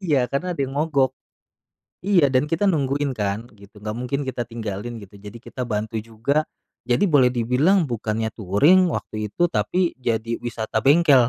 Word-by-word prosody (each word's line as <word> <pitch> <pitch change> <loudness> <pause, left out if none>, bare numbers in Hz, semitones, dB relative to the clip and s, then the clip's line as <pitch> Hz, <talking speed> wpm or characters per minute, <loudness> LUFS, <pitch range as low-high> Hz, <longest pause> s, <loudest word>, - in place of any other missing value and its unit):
Iya 145 -9 +2
karena 180 +7 -1
ada 165 - -6
yang 135 - -7
mogok, 140 -4 +2 0.9
iya 185 -6 +4
dan 130 +1 +3
kita 165 +5 +1
nungguin 145 -4 0
kan 105 +1 -2
gitu 100 +1 -15
nggak 105 +1 -4
mungkin 125 +3 -2
kita 120 -1 -2
tinggalin 115 0 -5
gitu 100 +1 -14
jadi 105 +3 -10
kita 125 - -7
bantu 110 0 -3
juga, 115 +7 -1 0.4
jadi 120 +10 +2
boleh 135 -6 +5
dibilang 130 - +3
bukannya 110 -2 -2
touring 145 - +4
waktu 110 -7 -4
itu 175 - -3
tapi 180 0 0
jadi 115 -2 -1
wisata 115 -2 -2
bengkel. 140 -4 +5
125 Hz, 165 wpm, -23 LUFS, 110-145 Hz, 0.9 s, boleh